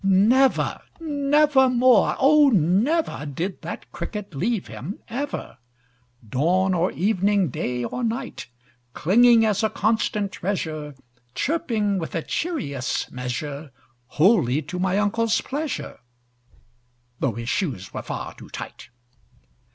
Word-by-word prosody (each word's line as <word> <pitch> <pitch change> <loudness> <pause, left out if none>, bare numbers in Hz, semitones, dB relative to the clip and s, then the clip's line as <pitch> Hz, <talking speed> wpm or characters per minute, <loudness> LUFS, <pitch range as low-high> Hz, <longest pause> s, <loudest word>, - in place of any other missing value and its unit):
Never 215 +8 +3 0.2
never 290 -3 +3
more 250 -2 +4
oh, 290 +1 +6
never, 210 - +1
Did 170 +7 -4
that - - -7
Cricket 210 -4 -6
leave 200 - -1
him 180 - -7
ever, 280 +5 -5 0.7
Dawn 180 - +2
or 180 +1 +1
evening, 200 -1 +1
day 125 0 -3
or 245 - -4
night; 235 +3 -3 0.5
Clinging 230 +5 +5
as 210 -2 +1
a 220 - +2
constant 210 -2 0
treasure, 155 -7 -4 0.4
Chirping 225 - 0
with 165 - -5
a 165 - -1
cheerious 185 - -3
measure, 140 +4 -5 0.5
Wholly 155 - +4
to 180 +6 -6
my 190 +1 +1
uncle's 220 +2 +1
pleasure 290 +1 -4 1.2
(Though 130 - 0
his 115 +1 -5
shoes 125 - -2
were - - -4
far - - -6
too - - -13
tight). - - -8
200 Hz, 120 wpm, -23 LUFS, 160-245 Hz, 1.2 s, oh